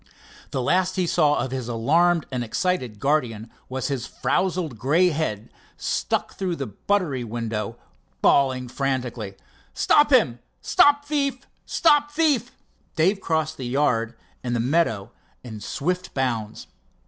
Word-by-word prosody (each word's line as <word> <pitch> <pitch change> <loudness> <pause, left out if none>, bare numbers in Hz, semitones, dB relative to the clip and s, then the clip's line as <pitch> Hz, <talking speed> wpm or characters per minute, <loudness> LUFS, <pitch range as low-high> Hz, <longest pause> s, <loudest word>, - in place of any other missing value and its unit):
The 130 - -2
last 185 +6 +1
he 185 -2 +1
saw 155 -3 +3
of 130 - -2
his 130 -3 -4
alarmed 160 +9 +2
and 125 -2 -2
excited 125 - -1
guardian 120 -6 0 0.2
was 130 0 -2
his 135 -4 -3
frowsled 165 - -1
grey 165 - +3
head 145 - -3 0.3
stuck - - -1
through 185 -3 -2
the 140 - -4
buttery 140 - -1
window, 110 -2 -4 0.4
bawling 130 -2 +3
frantically: 125 -6 -3 0.4
"Stop 295 0 +4
him! 170 - +4 0.2
stop 290 0 +4
thief! 280 -3 -1 0.2
stop 295 -3 +3
thief!" 295 -6 +2 0.5
Dave 190 +5 +2
crossed 160 -2 -1
the 130 - -5
yard 120 -4 +1 0.3
and 120 -1 -1
the - - 0
meadow 120 -6 +1 0.3
in 110 -4 -8
swift 180 - -3
bounds. 115 -5 -2
140 Hz, 135 wpm, -24 LUFS, 120-180 Hz, 0.5 s, Stop